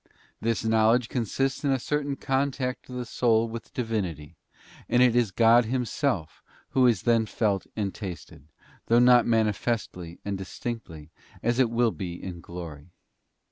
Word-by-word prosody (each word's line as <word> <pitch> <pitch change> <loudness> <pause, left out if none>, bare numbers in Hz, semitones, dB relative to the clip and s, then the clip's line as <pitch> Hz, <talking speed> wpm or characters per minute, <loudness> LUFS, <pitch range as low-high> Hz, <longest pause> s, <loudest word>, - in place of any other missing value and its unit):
This 115 -1 0
knowledge 110 +2 +3
consists 130 +4 -1
in 140 - +1
a 135 - +3
certain 145 +2 -2
contact 135 -2 -2
of 125 - -7
the 125 -1 -3
soul 115 -1 +2
with 115 0 -7
the - - -24
Divinity, 95 - -3 0.5
and 120 - +3
it 120 -2 +4
is 120 -3 +3
God 115 +3 +5
Himself 125 - -2 0.3
Who 130 -1 +4
is 110 -7 +2
then 115 -2 +3
felt 100 -4 0
and 100 -3 -2
tasted, 85 -7 -8 0.4
though 115 - +4
not 125 -1 +6
manifestly 110 -6 -1
and 100 -1 -3
distinctly, 95 -6 -7 0.3
as 120 +2 +1
it 125 -3 +4
will 115 0 +2
be 90 -5 -5
in 90 -1 -7
glory. 85 -3 -9
115 Hz, 155 wpm, -26 LUFS, 95-125 Hz, 0.5 s, not